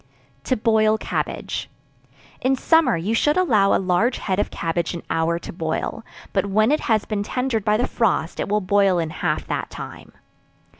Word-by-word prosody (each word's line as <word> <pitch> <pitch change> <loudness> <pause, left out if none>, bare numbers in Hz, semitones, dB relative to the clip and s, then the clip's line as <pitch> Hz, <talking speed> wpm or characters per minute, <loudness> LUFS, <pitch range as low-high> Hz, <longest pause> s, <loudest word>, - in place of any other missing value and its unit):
To 255 - +1
Boil 220 0 +3
Cabbage. - - -3 0.7
In 265 +1 +2
summer, 320 - +3
you 190 +7 -2
should 295 +7 +2
allow 215 - +3
a - - +4
large 190 +6 +1
head 190 -1 -2
of - - 0
cabbage 170 +1 -2
an 170 - -7
hour 165 +1 +1
to 170 - -8
boil, 160 +6 -3 0.3
but 200 0 +1
when 215 +5 +3
it 305 - +3
has 215 -2 +2
been 210 -1 -2
tendered 240 0 -1
by 210 +1 +2
the 245 - +1
frost, 195 -7 0
it - - -2
will 210 +1 +1
boil 195 -1 +3
in 165 -2 -1
half - - -2
that - - -3
time. - - -9
210 Hz, 185 wpm, -22 LUFS, 180-230 Hz, 0.7 s, a